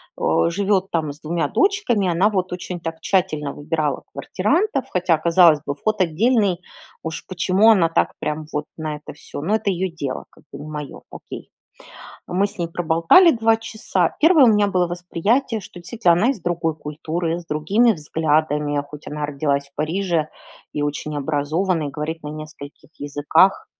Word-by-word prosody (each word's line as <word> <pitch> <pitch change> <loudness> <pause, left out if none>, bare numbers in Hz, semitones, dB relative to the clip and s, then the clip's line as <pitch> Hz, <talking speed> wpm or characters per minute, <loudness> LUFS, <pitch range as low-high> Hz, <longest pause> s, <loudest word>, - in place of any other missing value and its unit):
о, 80 - +2
живет 195 +1 0
там 160 -3 -1
с 145 - -17
2 165 +2 -1
дочками. 390 - +1
Она 180 +5 +3
вот 185 -3 -2
очень 180 0 -5
так 165 -1 -6
тщательно 155 -7 0
выбирала 150 -1 -2
квартирантов, 280 - 0
хотя, 180 -2 +2
казалось 165 -1 +5
бы, 140 - -3
вход 215 +6 -1
отдельный, 195 +2 +2 0.4
уж 160 0 -5
почему 185 +4 +4
она 180 -6 +4
так 165 - +1
прям 150 +1 -3
вот 150 0 -2
на 155 -2 -3
это 150 - -11
всё? 145 - -8
Но 195 +8 +1
это 220 -2 -1
ее 185 -1 -1
дело, 140 -6 -5
как - - -22
бы 140 - -9
не 145 - -8
мое, 150 -2 -7
окей. - - -10 0.8
Мы 190 +3 +1
с 200 - -12
ней 170 -2 -2
проболтали 170 - +5
2 225 -1 +3
часа. 220 -6 -1
Первое 320 -3 +6
у - - +6
меня 210 -2 +3
было 180 -2 +1
восприятие, 200 +8 -1
что 180 -2 -12
действительно 180 0 +2
она 210 +9 +3
из 260 -8 -4
другой 170 -2 -1
культуры, 160 +3 -3
с - - -14
другими 190 +11 +2
взглядами, 150 -3 0
хоть 150 0 -10
она 150 0 -3
родилась 140 -1 -1
в 140 - -41
Париже 165 0 -1 0.4
и 145 - -2
очень 145 +1 -3
образована, 155 +3 -1
и - - -7
говорит 155 +3 -5
на 150 - -6
нескольких 155 -1 -10
языках. 145 +6 +2
170 Hz, 175 wpm, -21 LUFS, 150-195 Hz, 0.8 s, Первое